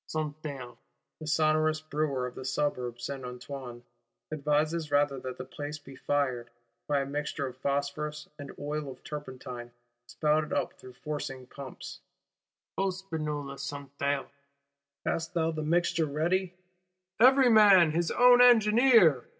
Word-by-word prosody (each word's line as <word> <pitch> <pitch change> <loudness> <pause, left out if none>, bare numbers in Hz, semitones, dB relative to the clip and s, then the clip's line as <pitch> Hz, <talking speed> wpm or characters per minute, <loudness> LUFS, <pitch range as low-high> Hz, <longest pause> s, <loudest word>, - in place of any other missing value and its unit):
Santerre, 145 -5 -5 0.4
the 155 - -8
sonorous 155 0 +2
Brewer 150 -4 -2
of 125 - -6
the - - -8
Suburb 125 -3 -2
Saint 130 +2 -5
Antoine, 125 -1 -8 0.5
advises 155 +2 0
rather 145 -1 +2
that 130 -1 -6
the 130 - -6
place 145 +3 -6
be 135 -2 -13
fired, 130 -4 -1 0.4
by 145 -1 +2
a - - -2
"mixture 145 0 -3
of 130 -2 -6
phosphorous 145 +2 -2
and 140 -1 -7
oil 145 0 -4
of 130 -1 -11
turpentine 130 -4 -7 0.4
spouted 150 0 0
up - - -1
through 130 - -14
forcing 135 -1 -5
pumps:" 135 +1 -9 0.8
O 195 0 +2
Spinola 155 -7 -5
Santerre, 140 0 -3 0.8
hast 165 +2 -2
thou 165 -1 +1
the 155 -1 -4
mixture 165 0 +1
ready? 175 +5 0 0.6
Every 260 +1 +6
man 195 -7 +7
his 170 +1 0
own 245 0 +6
engineer! 225 - +6
150 Hz, 135 wpm, -29 LUFS, 135-160 Hz, 0.8 s, man